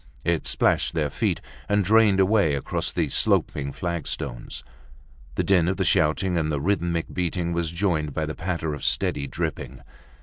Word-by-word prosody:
It 85 -1 0
splashed - - +2
their 75 -3 0
feet - - -1 0.3
and 105 -1 +2
drained 105 -1 +5
away 95 -6 +3
across 70 - -1
the - - -1
sloping 70 -1 +1
flagstones. 80 -9 -4 0.7
The - - 0
din 90 -4 +3
of 95 0 0
the - - +1
shouting 85 +4 +2
and 80 -1 -1
the 75 - -1
rhythmic 85 0 -1
beating 85 -1 -1
was 85 -1 -1
joined 85 -4 -1
by 80 +3 -2
the 75 - -4
patter 80 -2 -3
of 75 - -7
steady 70 - +1
dripping. - - -4
85 Hz, 165 wpm, -24 LUFS, 75-95 Hz, 0.7 s, drained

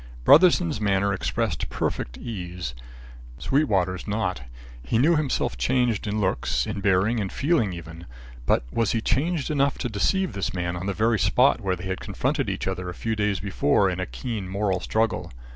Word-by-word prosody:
Brotherson's 165 -5 +5
manner 100 -1 +2
expressed 95 - -2
perfect - - -3
ease, 90 - -5 0.6
Sweetwater's 95 - 0
not. 100 - -1 0.4
He 65 - 0
knew 155 +8 +4
himself 150 -4 -1
changed 125 -5 +1
in 105 +1 -1
looks, 95 -10 0
in 100 - -4
bearing, 100 +4 +2
in 100 -2 -2
feeling, 140 - +1
even; 85 -1 -9 0.4
but - - +3
was 115 -3 +1
he 115 - 0
changed 155 +5 0
enough 140 -2 +1
to 125 - -3
deceive 185 - 0
this 95 -1 -3
man 90 -1 -2
on 90 +3 -5
the 100 - 0
very 110 +1 +2
spot - - +3
where 95 -1 0
they 90 +1 -9
had 95 0 -3
confronted 130 +5 -1
each 95 - -3
other 90 -1 -3
a 90 - -7
few 115 -1 -2
days 105 -3 0
before 95 0 +2
in 90 - -4
a 95 - -2
keen 110 -7 -5
moral 95 -1 0
struggle? 110 +4 -1
100 Hz, 175 wpm, -25 LUFS, 95-120 Hz, 0.6 s, Brotherson's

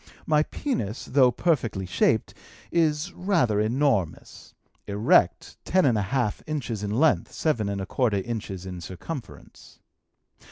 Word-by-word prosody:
My 150 -1 +3
penis, 145 - -3
though 130 -2 +4
perfectly 120 - 0
shaped, 90 - +1 0.4
is 160 +1 +1
rather 170 - +1
enormous 110 - -1 0.3
erect, 105 +2 +2
ten 185 -2 +2
and 125 -4 +3
a 105 - +1
half 120 -5 0
inches 135 -9 -3
in 105 - -3
length, 140 +10 +2
seven 115 -10 0
and 100 0 -3
a 95 - -3
quarter 115 -2 0
inches 100 -3 -4
in 90 -2 -7
circumference. 115 - -9
120 Hz, 130 wpm, -25 LUFS, 100-150 Hz, 0.4 s, though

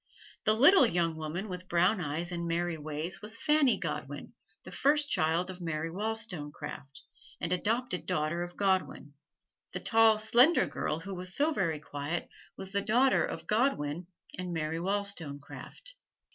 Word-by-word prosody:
The 215 - +4
little 285 - +7
young 170 -4 0
woman 160 +6 -4
with 180 -1 -7
brown 180 +4 +3
eyes 165 +3 -3
and 170 -1 -3
merry 170 0 -1
ways 155 +4 -5
was 220 +2 -4
Fanny 300 -4 +3
Godwin, - - -5 0.3
the - - -10
first 295 +1 +2
child 165 +4 +1
of 185 0 -11
Mary 165 -1 -3
Wollstonecraft 165 -9 -5 0.4
and 175 - 0
adopted 220 +1 -1
daughter 155 +3 0
of 175 0 -6
Godwin. 190 -7 0 0.6
The - - -2
tall 225 -1 +5
slender 240 +9 +5
girl 155 +2 -3
who 195 +3 -6
was 180 0 -1
so 305 +3 +2
very 165 - 0
quiet 145 +3 -4 0.3
was 190 0 -6
the 200 0 +1
daughter 250 +6 +3
of - - -5
Godwin 175 - 0 0.3
and 180 -1 -4
Mary 160 0 -2
Wollstonecraft. 195 - -4
180 Hz, 150 wpm, -30 LUFS, 160-220 Hz, 0.6 s, little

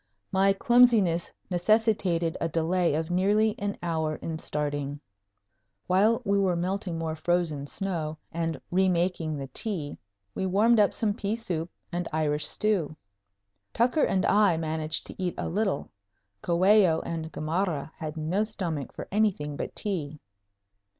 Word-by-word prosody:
My 195 +1 +4
clumsiness 210 -5 +4 0.2
necessitated 180 -3 +2
a 165 - 0
delay 170 0 +1
of 160 +2 -2
nearly 205 +4 +3
an 200 0 -2
hour 160 -2 -1
in 160 0 -5
starting. 145 -1 -3 0.9
While 215 +6 +3
we 200 0 +2
were 190 -3 +2
melting 180 0 -2
more 160 -1 -3
frozen 160 -3 -1
snow 160 -4 -3
and 165 0 -2
re 190 +1 +3
making 170 -3 0
the 135 - -4
tea, 175 -10 -3 0.3
we 190 - -2
warmed 215 +5 +4
up 205 - +3
some 215 -3 0
pea 205 +1 -2
soup 175 -7 -3 0.2
and 175 0 -2
Irish 150 -1 +1
stew. 190 -8 0 0.8
Tucker 250 +6 +3
and 190 -1 +1
I 200 -5 +4
managed 155 -1 -1
to - - -9
eat 180 - -1
a - - -2
little. 195 -4 -1 0.5
Coello 180 -1 +4
and 160 -1 -4
Gamarra 160 -1 -2
had 155 -1 -6
no 165 +7 0
stomachs 175 - -4
for - - -7
anything 185 -9 0
but - - -5
tea. 155 -8 -3
175 Hz, 145 wpm, -27 LUFS, 160-200 Hz, 0.9 s, My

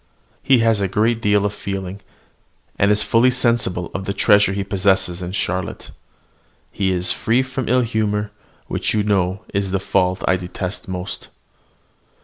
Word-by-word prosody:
He 135 - +4
has 110 -3 +3
a 100 - +1
great 110 +4 +1
deal 105 -1 +2
of 105 - -1
feeling, 95 -1 -5 0.8
and 100 - +4
is 105 0 +4
fully 115 +3 +4
sensible 115 -8 0
of 95 0 -4
the 100 - -2
treasure 100 -1 +4
he 100 0 -2
possesses 95 -2 +1
in 90 0 -5
Charlotte. 95 -2 -3 0.8
He 95 -1 -1
is 90 0 +1
free 120 +4 +1
from 130 -2 -4
ill 125 +1 +4
humour, 105 -3 -1 0.3
which - - -2
you 105 - +2
know 100 -1 0
is 100 -1 0
the 95 +1 0
fault 95 -1 0
I 95 - +3
detest 90 +2 -6
most. 90 0 -5
100 Hz, 160 wpm, -20 LUFS, 95-110 Hz, 0.8 s, He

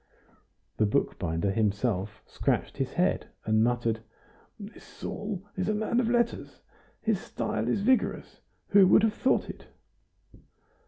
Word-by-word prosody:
The 110 - +3
bookbinder 85 -2 0
himself 105 0 -1
scratched - - -1
his - - -2
head - - +1 0.2
and 110 0 +3
muttered: 120 -1 0 0.6
"This 205 +1 -11
Saul 205 -2 -6
is 185 +2 -1
a 215 - +1
man 220 +3 0
of 235 -2 +1
letters; 235 -1 -1 0.4
his 220 -4 0
style 110 - -3
is 125 +11 +1
vigorous! 255 +4 0 0.3
Who 200 -2 +7
would 210 - +6
have 220 -1 +3
thought 260 - +1
it?" - - -10
175 Hz, 130 wpm, -28 LUFS, -, 0.6 s, Who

